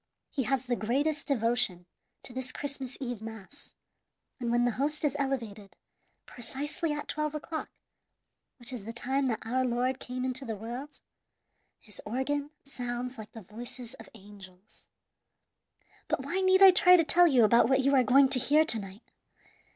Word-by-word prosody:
He 265 -4 -2
has 265 -2 0
the 245 -1 0
greatest 285 +7 -1
devotion 230 -8 0 0.4
to 245 - -7
this 260 0 -3
Christmas 270 -2 -5
Eve 245 -5 -5
mass, 225 +5 -11 0.6
and 240 -2 -2
when 240 +1 +2
the 245 - +2
host 300 +2 0
is 290 - 0
elevated, 230 -8 -4 0.5
precisely 290 +6 -4
at 295 0 -4
twelve 305 0 -2
o'clock, 315 +1 -5 0.9
which 250 0 -8
is 235 -5 -6
the 230 - -6
time 265 +3 0
that 225 -3 -3
Our 255 +3 0
Lord 250 +1 0
came 250 +1 -5
into 260 +1 -2
the 225 -4 -4
world, 240 +8 -8 0.8
his 210 -4 -9
organ 280 +5 -2
sounds 245 -2 -5
like 215 0 -10
the 225 - -10
voices 240 +4 -8
of - - -13
angels. 195 -2 -15 1.2
"But - - -1
why 380 - -2
need 375 +1 +5
I 385 - +11
try 360 0 +6
to 330 - +4
tell 345 +3 +5
you 260 -7 +4
about 235 +2 +5
what 265 0 +3
you 275 +1 +2
are 265 - +6
going 265 +2 +5
to 265 -1 +2
hear 300 +5 +4
to 230 -8 +1
night? 195 +2 -10
255 Hz, 170 wpm, -29 LUFS, 230-280 Hz, 1.2 s, I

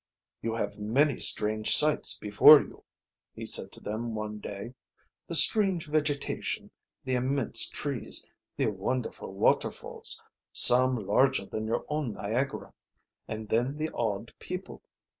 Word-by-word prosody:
"You 115 0 -3
have 105 -2 -4
many 130 +7 +1
strange 110 0 +1
sights 150 0 +2
before 110 +9 +7
you," - - -10 0.5
he - - -7
said - - +1
to - - -11
them 110 +2 -5
one 105 0 -5
day. 100 +4 -8 0.5
"The - - -1
strange 195 -6 +4
vegetation, 150 -1 -2 0.3
the 130 - -3
immense 130 +1 0
trees, 140 -6 -2 0.3
the - - 0
wonderful 105 +3 -4
waterfalls, 95 - -1 0.3
some 125 -3 +6
larger 130 +2 +2
than 110 +2 -5
your 115 - -2
own 150 -6 -3
Niagara, 120 +8 -4 0.5
and 110 0 -6
then 125 +5 -1
the 155 +1 -3
odd 110 -1 -3
people. 185 +1 -8
120 Hz, 130 wpm, -28 LUFS, 105-140 Hz, 0.5 s, before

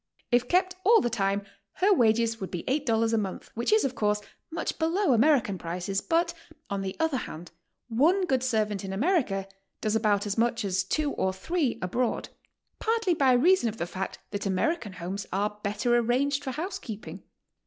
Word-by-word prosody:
If 245 0 +3
kept 370 +3 +2
all 450 +4 +6
the 240 - -1
time, 200 -2 0 0.3
her 400 +2 +3
wages 230 - +2
would 190 - -4
be 175 - -4
$8 230 -5 +1
a - - +3
month, 195 -3 -5
which 235 - -1
is, 435 -5 +4
of 265 - -1
course, 210 -3 +1 0.3
much 330 0 -3
below 330 -1 +2
American 235 - +3
prices, 180 +4 -3
but, 340 0 +1 0.4
on 200 -1 -1
the 190 -1 -4
other 320 -4 +1
hand, 170 -7 -7 0.4
one 320 - +3
good 265 -7 +1
servant 215 -6 0
in 190 0 -4
America 215 - +1 0.3
does 215 0 0
about 210 -2 +2
as 205 +2 -2
much 235 -1 +1
as 190 0 +1
two 290 +9 -1
or 190 - 0
three 280 - -1
abroad, 235 +7 -1 0.5
partly 450 -4 +1
by 270 -5 +4
leason 315 -1 +4
of 220 - -8
the 170 - -2
fact 185 +2 -5
that 205 -1 -3
American 205 - 0
homes 185 +3 -5
are 210 +2 -1
l)etter 210 +4 -1
arranged 265 +4 +1
for 270 - -3
housekeeping. 305 - -6
235 Hz, 180 wpm, -27 LUFS, 200-310 Hz, 0.5 s, all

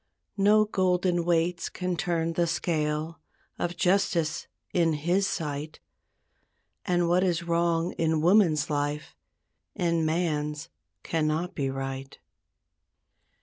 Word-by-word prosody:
No 210 +2 +5
golden 180 -3 +1
weights 170 0 +1
can 180 -1 -3
turn 165 0 -1
the 170 +1 +1
scale 155 -1 -1 0.4
Of 175 0 -2
justice 175 -4 +1 0.3
in 165 -2 +3
His 175 +6 +1
sight; 150 -3 -4 1.1
And 175 -1 +1
what 180 +2 +3
is 175 -2 0
wrong 170 0 +1
in 160 -1 +2
woman's 170 -5 +3
life 145 +1 -2 0.6
In 170 -4 +1
man's 155 -2 -1 0.3
cannot 160 +2 -1
be 135 -3 -1
right. 135 0 -5
170 Hz, 105 wpm, -27 LUFS, 155-175 Hz, 1.1 s, No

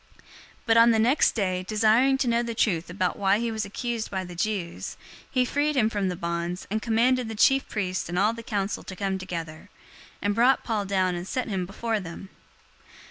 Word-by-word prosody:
022:030 - - -29 0.4
But 225 0 +4
on 230 +1 +7
the 225 - +4
next 245 +7 +4
day, 185 -4 -1
desiring 225 +5 +3
to 265 - 0
know 235 0 +2
the 235 -1 -4
truth 175 -7 0
about 180 0 -1
why 195 0 +3
he 235 +1 -1
was 220 -1 -2
accused 230 +2 -3
by 190 -1 -3
the 180 - -9
Jews, 180 -2 -3 0.3
he 255 -1 +2
freed 290 +3 0
him 220 -3 +3
from 200 -3 0
the 180 - -3
bonds, 170 +1 -3
and 215 +1 0
commanded 240 +1 +2
the 220 - -5
chief 270 +5 +3
priests 185 -4 -2
and 175 - -3
all 210 +4 +3
the 230 - -7
council 205 -3 -2
to 190 - -9
come 190 0 -2
together, 170 -1 -6 0.5
and 205 0 0
brought 245 +5 +3
Paul 215 -4 -1
down 190 -2 +1
and 175 +1 -5
set 255 +4 -2
him 185 -3 -2
before 220 +3 -2
them. 180 +1 -9
210 Hz, 210 wpm, -26 LUFS, 185-230 Hz, 0.5 s, on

